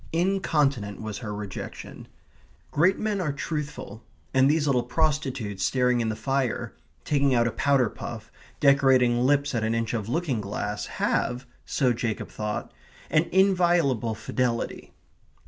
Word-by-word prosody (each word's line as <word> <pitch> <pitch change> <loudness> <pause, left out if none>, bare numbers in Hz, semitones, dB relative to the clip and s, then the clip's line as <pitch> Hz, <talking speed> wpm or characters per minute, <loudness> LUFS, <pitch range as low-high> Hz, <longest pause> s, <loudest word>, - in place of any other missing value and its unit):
Incontinent 150 - +1
was 110 -2 -5
her 110 -4 -5
rejection. 105 -2 -7 0.6
Great 180 +6 +3
men 210 -3 -1
are 155 -5 0
truthful, 145 -7 -5 0.3
and 135 +1 +5
these 150 0 +2
little 135 -4 +2
prostitutes, 130 - -1
staring 125 +2 +2
in 115 - 0
the 110 - -2
fire, 130 +2 -1 0.3
taking 140 -3 +2
out 120 -1 +3
a 115 - 0
powder 140 -2 +2
puff, - - -8 0.3
decorating 130 -4 +4
lips 140 +2 +2
at 115 -2 0
an 110 +1 0
inch 115 0 -1
of 110 -2 -3
looking 145 -6 -1
glass, 105 +1 -4
have 125 +1 -1 0.2
(so 130 -4 +2
Jacob 115 -2 -3
thought) 105 0 -4 0.4
an 155 +2 +4
inviolable 175 - +3
fidelity. 115 +2 -2
130 Hz, 140 wpm, -26 LUFS, 115-150 Hz, 0.6 s, and